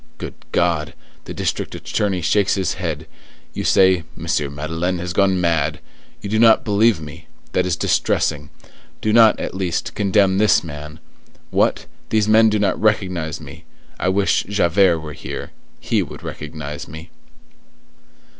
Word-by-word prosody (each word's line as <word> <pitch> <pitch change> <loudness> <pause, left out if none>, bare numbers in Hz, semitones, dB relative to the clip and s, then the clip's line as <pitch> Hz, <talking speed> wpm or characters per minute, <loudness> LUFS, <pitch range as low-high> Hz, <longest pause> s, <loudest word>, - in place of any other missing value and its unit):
Good - - -6 0.2
God! 85 -3 0 0.3
the - - -7
district - - -2
attorney 95 -3 -2
shakes 100 +4 +2
his 95 -2 -1
head; 80 -4 -4 0.5
you - - -4
say, 95 -3 +4
'M. 70 -1 -2
Madeleine 80 +4 -2
has 90 +1 -4
gone 95 -1 +2
mad!' 85 -5 0 0.4
you - - -5
do 110 +2 0
not 115 -1 +5
believe 105 -1 +3
me! 75 +1 -10 0.2
that 90 0 +1
is 90 - +1
distressing. - - 0 0.5
Do 110 - 0
not, 115 -2 +6
at - - -4
least, 90 -3 -2
condemn 100 -1 +2
this 105 -3 +4
man! 75 0 -8 0.5
What! - - +1 0.2
these 110 -1 +2
men 110 +1 +6
do 105 - +1
not 100 -3 0
recognize 90 -7 0
me! 80 +1 -12 0.4
I 90 - +1
wish 100 +1 +2
Javert 90 -3 +3
were 75 -1 -7
here; - - -7 0.3
he - - 0
would - - -8
recognize 75 -1 -7
me." 80 +3 -10
90 Hz, 150 wpm, -20 LUFS, 80-100 Hz, 0.5 s, not